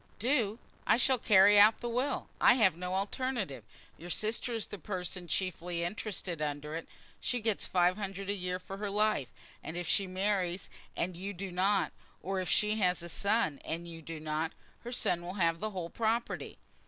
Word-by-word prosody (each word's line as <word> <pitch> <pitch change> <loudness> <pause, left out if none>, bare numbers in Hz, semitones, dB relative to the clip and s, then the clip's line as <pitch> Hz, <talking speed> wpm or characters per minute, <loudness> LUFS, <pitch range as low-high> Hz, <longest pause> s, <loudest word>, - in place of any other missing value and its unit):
"Do! 230 -3 +1 0.3
I - - +6
shall 255 0 +4
carry 205 0 +7
out 215 +2 +7
the 240 - -4
will. 255 +4 -1
I - - +8
have 200 -9 +4
no 180 +2 -3
alternative. 200 - -2 0.4
Your 175 - -8
sister 220 +6 0
is 225 -3 -2
the 205 - -8
person 180 -1 -4
chiefly 175 -1 -2
interested 180 -3 -4
under 150 0 -3
it. 165 - -5 0.3
She 245 - -1
gets 220 -2 0
five 180 +1 +3
hundred 195 -1 -4
a 200 - +1
year 180 -2 -2
for 190 +1 -8
her 205 0 -3
life; 210 - +1 0.4
and 160 - -5
if 175 -1 -3
she 195 - +2
marries 185 -1 -1 0.3
and 180 +1 -1
you 195 +4 -5
don't, 195 +2 +1 0.3
or 195 0 -1
if 185 -2 -2
she 210 +3 +3
has 180 -4 +2
a 170 - -5
son 200 -2 +1
and 170 +1 -4
you 165 -1 -8
don't, 155 0 -3 0.3
her 240 - -7
son 180 -8 +1
will 175 +2 -6
have 165 -4 +2
the 215 - -2
whole 180 -4 -5
property." 230 +1 -1
190 Hz, 185 wpm, -32 LUFS, 175-210 Hz, 0.4 s, I